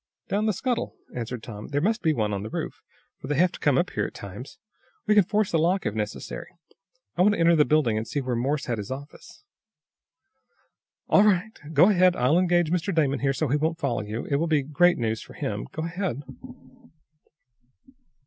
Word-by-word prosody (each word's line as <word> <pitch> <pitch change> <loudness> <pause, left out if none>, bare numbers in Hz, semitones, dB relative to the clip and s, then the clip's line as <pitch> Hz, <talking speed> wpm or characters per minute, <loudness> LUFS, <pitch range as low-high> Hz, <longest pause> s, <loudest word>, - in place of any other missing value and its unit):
"Down 205 +3 0
the - - +3
scuttle," 245 +5 -2 0.2
answered 120 -1 -5
Tom. 105 -3 -8
"There 145 0 -1
must 220 +8 0
be 160 - +2
one 110 -7 -1
on 100 - -2
the 105 - -6
roof, - - -5 0.4
for - - -8
they 145 - 0
have 175 +4 +3
to - - -10
come 145 -3 +2
up 175 - +1
here 105 - -1
at - - -13
times. 100 +7 -9 0.5
We 215 - +3
can 205 -1 +6
force 210 +1 0
the 165 - +2
lock, 180 +4 +1
if - - -1
necessary. 105 0 -5 0.7
I - - +2
want 205 +3 +5
to - - -6
enter 170 0 +5
the 150 -2 +4
building 145 -8 +2
and 110 - -5
see 145 - -2
where 130 -2 -2
Morse 140 +5 -1
had 120 -3 -2
his 100 - -6
office." 140 +3 -9 1.6
"All 200 - +5
right. 210 +1 +2 0.2
Go 165 +7 +6
ahead. 185 -2 +4
I'll 135 +8 +3
engage 175 -3 +2
Mr. 180 +2 0
Damon 145 -6 +1
here 135 0 +1
so 150 +3 -1
he 145 - +2
won't 160 +2 -1
follow 135 -8 -1
you. 105 +2 -5
It 140 - 0
will 165 +3 0
be 155 -3 +2
great 175 +5 +3
news 110 -2 -1
for - - -12
him. - - -4
Go 160 - -4
ahead." 170 - -3
150 Hz, 210 wpm, -25 LUFS, 125-180 Hz, 1.6 s, can